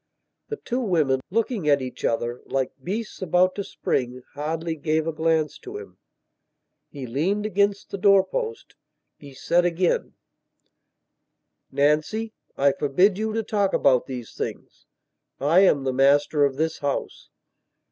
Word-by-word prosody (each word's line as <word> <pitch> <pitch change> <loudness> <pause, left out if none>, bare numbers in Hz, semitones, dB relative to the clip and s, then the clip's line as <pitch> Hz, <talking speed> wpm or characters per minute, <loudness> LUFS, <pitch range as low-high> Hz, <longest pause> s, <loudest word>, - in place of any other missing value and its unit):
The 440 - -2
two 250 - -3
women, 155 - +1
looking 220 -5 0
at 140 -1 +5
each 130 -1 -7
other, 120 +1 -1
like 135 -1 -1
beasts 210 +4 -4
about 185 +1 +3
to 200 - -4
spring, 125 -7 -2
hardly 160 +3 -3
gave 155 +1 0
a 165 - -2
glance 160 -1 0
to 390 +2 -8
him. 430 0 -12 0.9
He 140 -3 -7
leaned 175 - -1
against 200 0 0
the 200 - -4
door 195 0 +6
post. 450 - -5 0.5
He 140 -2 -13
said 175 +6 +2
again: 175 +1 0 1.6
"Nancy, 155 +11 +1 0.2
I 140 +1 +4
forbid 180 +9 +2
you 220 0 -1
to 225 0 -1
talk 205 -2 0
about 130 -3 +3
these 125 -4 -7
things. - - -7 0.5
I 155 +6 +4
am 165 -8 +4
the 130 -1 -1
master 145 +2 +4
of 135 -1 -1
this 160 +3 -1
house." 140 -1 -3
160 Hz, 145 wpm, -24 LUFS, 140-200 Hz, 1.6 s, door